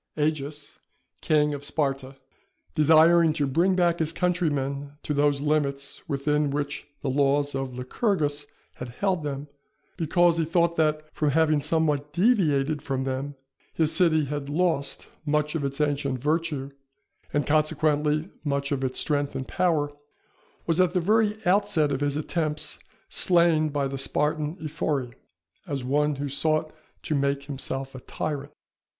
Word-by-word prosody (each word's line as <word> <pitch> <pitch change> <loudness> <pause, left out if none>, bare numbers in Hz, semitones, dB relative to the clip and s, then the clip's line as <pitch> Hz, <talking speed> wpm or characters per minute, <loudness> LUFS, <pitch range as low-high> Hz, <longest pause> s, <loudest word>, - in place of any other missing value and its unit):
Agis, 150 -1 -2 0.4
King 150 -1 +2
of 145 0 -6
Sparta, 135 -2 -2 0.6
desiring 160 +2 +5
to 150 -2 0
bring 170 +8 +2
back 175 -2 +2
his 160 -1 +1
countrymen 145 -6 -1
to 150 - -2
those 145 -1 +2
limits 140 0 -1
within 150 +1 +1
which 145 0 -3 0.2
the - - -2
laws 140 +1 +2
of 135 -2 -3
Lycurgus 145 - -1 0.3
had 125 - -6
held 185 +7 -1
them, 145 -1 -4 0.5
because 170 0 +3
he 165 - +2
thought 170 +1 +2
that, 155 -1 +1
from 150 - +1
having 155 0 +3
somewhat 150 -1 0
deviated 155 - +2
from 135 -2 -2
them, 135 +2 -3 0.4
his 160 -1 +2
city 160 -4 +4
had 140 0 -4
lost 160 -2 0 0.2
much 150 0 0
of 160 -3 -2
its 140 +1 -3
ancient 145 -3 0
virtue 150 0 -1 0.6
and, 145 +1 0
consequently 150 0 +1
much 140 -1 -1
of 135 -2 -1
its 130 -1 0
strength 145 -2 -1
and 130 - -4
power, 155 -5 +1 0.7
was, 165 +2 +2
at 180 -1 +1
the - - +4
very 210 +3 +2
outset 180 -5 +2
of 135 0 -2
his 145 0 0
attempts, 155 -1 -2 0.3
slain 170 -3 +3
by 140 -1 -1
the 135 0 -4
Spartan 150 +4 0
Ephori, 140 -5 -2 0.5
as 140 -3 -3
one 145 +3 +1
who 140 +1 -3
sought 155 +3 0 0.3
to - - -2
make 140 -1 0
himself 135 -1 -4
a 130 - -8
tyrant. 145 +2 -4
150 Hz, 145 wpm, -26 LUFS, 140-160 Hz, 0.7 s, desiring